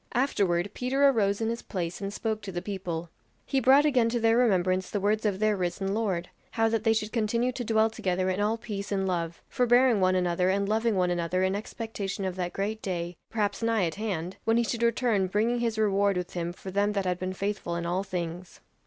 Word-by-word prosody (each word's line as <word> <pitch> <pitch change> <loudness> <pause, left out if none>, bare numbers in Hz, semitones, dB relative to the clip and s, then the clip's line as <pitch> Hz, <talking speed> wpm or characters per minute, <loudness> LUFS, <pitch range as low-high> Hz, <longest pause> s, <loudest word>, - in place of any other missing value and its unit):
Afterward 200 -8 +1
Peter 270 +3 +2
arose 205 -6 +2
in 225 - 0
his 235 +1 -3
place 180 -1 -4
and 195 0 -3
spoke 220 +1 -2
to 200 -2 -6
the 175 - -3
people; 175 -4 -4 0.3
he 270 - +1
brought 265 +4 +6
again 250 -6 +3
to 240 +1 0
their 225 0 +3
remembrance 185 -6 +2
the 205 - -1
words 210 +2 +1
of 200 -2 0
their 215 +1 +2
risen 195 +1 -2
Lord, 195 -6 -1 0.2
'how 225 0 +1
that 225 -1 0
they 225 - +4
should 215 -1 0
continue 235 +2 +1
to 245 0 -5
dwell 220 -1 +3
together 185 -4 -1
in 185 +2 0
all 215 +2 +1
peace 205 -3 -6
and 195 -1 0
love, 170 -2 -3
forbearing 245 -3 +3
one 185 0 +3
another 180 0 +1
and 200 +1 +1
loving 220 +1 +1
one 180 -1 +2
another 175 +1 0
in 190 0 +1
expectation 205 -1 -4
of 185 -1 -2
that 180 -1 -3
great 215 +3 -3
day, 175 -2 -3
perhaps 205 -2 -1
nigh 225 -4 +2
at 165 - -2
hand, 190 -4 -4
when 225 +1 +2
he 235 - +3
should 235 +1 -2
return 230 -4 +2
bringing 225 +5 +1
his 230 -2 -1
reward 200 -2 +2
with 180 0 -4
him 175 -1 -2
for 190 +2 -9
them 205 +2 +1
that 200 -2 -1
had 180 -1 -1
been 185 0 -2
faithful 195 -2 -3
in 170 0 -3
all 175 +2 0
things. 175 -1 -5
200 Hz, 225 wpm, -28 LUFS, 185-225 Hz, 0.3 s, brought